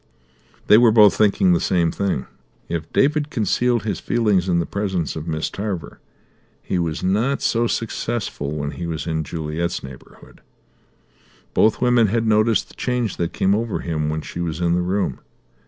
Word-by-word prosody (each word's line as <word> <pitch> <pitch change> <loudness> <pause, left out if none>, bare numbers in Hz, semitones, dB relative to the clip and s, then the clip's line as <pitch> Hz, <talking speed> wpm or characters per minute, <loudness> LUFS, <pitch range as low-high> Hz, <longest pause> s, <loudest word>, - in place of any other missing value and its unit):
They 105 - +7
were 120 -1 +6
both 105 -2 +6
thinking 100 -4 +3
the 85 - +2
same 85 -3 +1
thing. 100 -10 -2 0.4
If 80 -1 -4
David 150 +1 +2
concealed 120 - +1
his 105 -3 -2
feelings 105 -6 +1
in 85 - +2
the 85 - +1
presence 95 -5 -2
of 80 +1 -6
Miss 80 -1 -2
Tarver 100 -7 -5 0.6
he 90 - -1
was 80 -2 -2
not 110 +9 +1
so 120 0 +2
successful 110 -10 -3
when 75 -1 -3
he 85 +1 -6
was 80 -2 -4
in 80 -1 -1
Juliet's 80 +2 -3
neighbourhood. 65 -1 -13 1.1
Both 110 - +3
women 120 -2 +4
had 115 +3 0
noticed 110 +1 +2
the - - -16
change 125 -5 -2
that 85 -1 -2
came 95 - +1
over 110 0 -1
him 75 -3 -2
when 80 0 -2
she 85 - -6
was 80 -1 -3
in 85 -1 +1
the 90 - +1
room. 95 +3 -1
95 Hz, 170 wpm, -21 LUFS, 85-110 Hz, 1.1 s, They